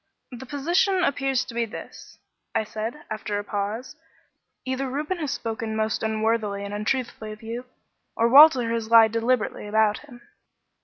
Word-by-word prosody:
"The 250 +1 -9
position 345 +7 +1
appears 270 -3 0
to 245 - -9
be 235 0 0
this," 225 - -10 0.4
I - - +2
said, 225 +7 -6
after 210 -1 -3
a 205 - -3
pause, 210 +7 -4 0.7
"either 260 +1 -2
Reuben 300 +7 -3
has 300 -3 -2
spoken 225 -3 -4
most 220 0 -1
unworthily 220 -2 -1
and 200 - -6
untruthfully 220 0 -2
of 215 +2 -11
you, 235 +3 -6 0.5
or 230 - +3
Walter 265 -3 +7
has 225 -1 -3
lied 225 -1 +7
deliberately 230 -2 -1
about 215 0 +2
him." 250 -5 -15
230 Hz, 155 wpm, -24 LUFS, 220-265 Hz, 0.7 s, Walter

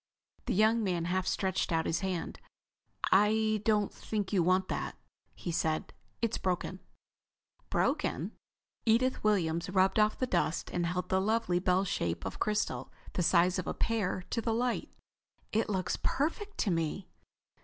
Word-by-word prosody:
The - - +1
young 220 +3 +4
man 175 -4 0
half 185 +1 0
stretched 190 -2 0
out 160 -1 +1
his 165 - 0
hand. 185 -4 -3 0.7
"I 215 +2 +4
don't 210 -2 +2
think 210 -2 -3
you 190 - +4
want 185 +2 +3
that," - - -3 0.4
he 175 - -4
said. 160 -1 -1 0.3
"It's 230 -1 0
broken." 185 0 -2 0.9
"Broken?" - - 0 0.5
Edith 245 +3 +2
Williams 170 -5 +1
rubbed 190 +2 +3
off 215 0 +3
the 255 - +1
dust 170 -7 0
and 175 -1 0
held 180 +1 -2
the 190 0 +2
lovely 215 -3 +1
bell 185 +1 +2
shape 85 - -2
of 95 - -5
crystal, 210 -12 -1 0.2
the - - 0
size 180 +2 +4
of 180 - -4
a - - -2
pear, 210 -5 0
to 230 - 0
the 225 -1 0
light. 245 +1 0 0.6
"It 220 +1 +1
looks 190 -3 -1
perfect 395 +8 -1
to 200 - +1
me." 165 +3 -1
190 Hz, 155 wpm, -31 LUFS, 175-215 Hz, 0.9 s, young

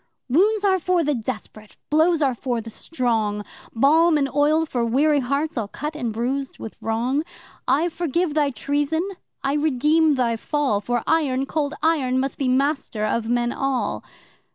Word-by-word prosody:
'Wounds 400 - +3
are 380 -1 +3
for 360 0 +1
the 295 0 +1
desperate, 215 -2 -6
blows 320 +1 +3
are 270 -2 +2
for 240 0 -2
the 225 0 -8
strong, 220 -8 -1 0.3
Balm 310 +7 +4
and 280 -2 +1
oil 300 +3 +3
for 245 -6 -2
weary 285 +6 +3
hearts 280 +2 -1
all 215 - -3
cut 300 +8 -5
and 245 -7 -2
bruised 260 +5 -3
with 225 - -8
wrong. 240 +6 0 0.5
I 315 +5 +3
forgive 340 -1 -1
thy 295 -2 +2
treason 290 +6 -1 0.4
I 275 0 +1
redeem 300 +1 +3
thy 235 -3 0
fall 270 -5 0
For 240 +2 -1
Iron 275 -5 +1
Cold 290 0 -2
Iron 275 -6 +2
must 270 +1 -3
be 270 - 0
master 260 -4 0
of 225 +1 -1
men 240 0 +1
all! 270 -1 -2
275 Hz, 165 wpm, -23 LUFS, 240-310 Hz, 0.5 s, Balm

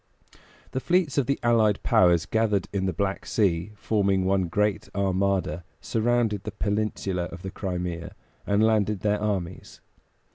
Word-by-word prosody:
The 130 - -1
fleets 160 +1 +1
of 130 - 0
the 140 - 0
allied 110 -3 +3
powers 85 -3 +4
gathered 110 -4 +1
in 95 -1 0
the - - +1
Black 95 +3 -2
Sea, 95 -3 +1
forming 100 -3 +1
one 95 -1 +2
great 105 +4 0
armada; 95 -4 0 0.2
surrounded 115 -2 0
the 105 - -6
peninsula 100 -4 -1
of 90 +1 -9
the 95 - -5
Crimea, 90 -4 -4 0.3
and 100 +1 +3
landed 105 -3 +2
their 105 0 +1
armies. 95 -4 -3
100 Hz, 145 wpm, -26 LUFS, 95-110 Hz, 0.3 s, powers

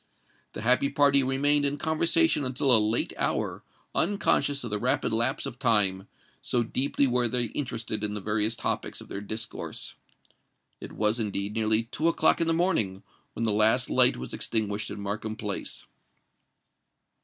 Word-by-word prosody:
The - - -6
happy 125 +4 +3
party 140 -1 +4
remained 145 +2 +1
in 140 0 0
conversation 160 - +2
until 130 0 +4
a - - +8
late 110 +2 0
hour—unconscious 145 -8 -1
of 120 - -6
the 105 - -1
rapid 110 - 0
lapse 115 +5 0
of 125 -3 -7
time, 105 -6 +2 0.3
so 120 - 0
deeply 135 +4 0
were 125 -2 +1
they 120 +1 -1
interested 115 -6 -4
in 105 0 -1
the - - -2
various 105 +2 -1
topics - - -4
of - - -13
their 100 - -5
discourse. 110 +2 -5 0.9
It - - -9
was, 110 +2 +1
indeed, 100 -1 -2
nearly 110 0 +2
two 140 +7 -2
o'clock 170 - +3
in 165 - +1
the - - +2
morning 135 - 0 0.3
when 115 - -4
the 110 - +2
last 110 +4 +2
light 125 0 +5
was - - -7
extinguished 105 -2 -2
in 105 - -7
Markham 105 +2 -4
Place. 105 -2 -4
115 Hz, 160 wpm, -27 LUFS, 105-140 Hz, 0.9 s, a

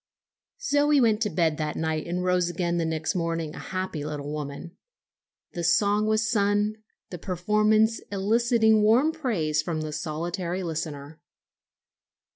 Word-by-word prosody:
Zoe 295 - +3
went 225 -3 +3
to 210 - +1
bed 160 -3 +1
that 155 -1 -3
night 160 0 -2
and 180 +1 -2
rose 180 -1 +1
again 175 0 -1
the 165 - 0
next 160 0 -1
morning 165 -3 -2
a - - -8
happy 185 -5 -4
little 145 -1 -5
woman. 150 +4 -6 0.8
The 175 - -4
song 205 +4 +2
was 220 +1 +1
sung, 205 -1 +1 0.3
the 180 - -6
performance 215 +5 +2
eliciting 220 +2 +3
warm 235 +9 +4
praise 190 - -1
from 155 0 -3
the 155 0 -4
solitary 175 +4 -3
listener. 155 -2 -5
180 Hz, 140 wpm, -26 LUFS, 160-215 Hz, 0.8 s, warm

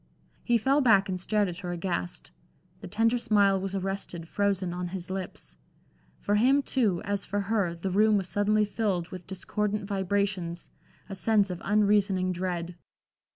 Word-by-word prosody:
He 240 -1 +3
fell 270 +6 +2
back 210 -6 +4
and 185 -1 -2
stared 205 +3 +1
at 175 -1 -6
her 180 -3 -5
aghast. 170 - -4 0.5
The - - -8
tender 225 +3 +2
smile 200 -4 +3
was 195 0 -3
arrested, 195 -3 -4
frozen 195 -2 0
on 180 0 -3
his 180 0 -6
lips. 190 -1 -6 0.6
For 205 - -1
him, 260 +7 +4
too, 215 -12 0
as 200 -1 -1
for 205 0 -2
her, 200 -4 0
the 185 +3 -4
room 210 +2 +4
was 190 -2 -2
suddenly 210 +2 +2
filled 200 -5 -1
with 180 -2 -9
discordant 205 +2 -2
vibrations, 195 -3 -2 0.4
a 200 - -7
sense 200 0 +2
of 175 - -6
unreasoning 200 -2 +2
dread. 175 -1 -3
195 Hz, 160 wpm, -28 LUFS, 180-210 Hz, 0.6 s, back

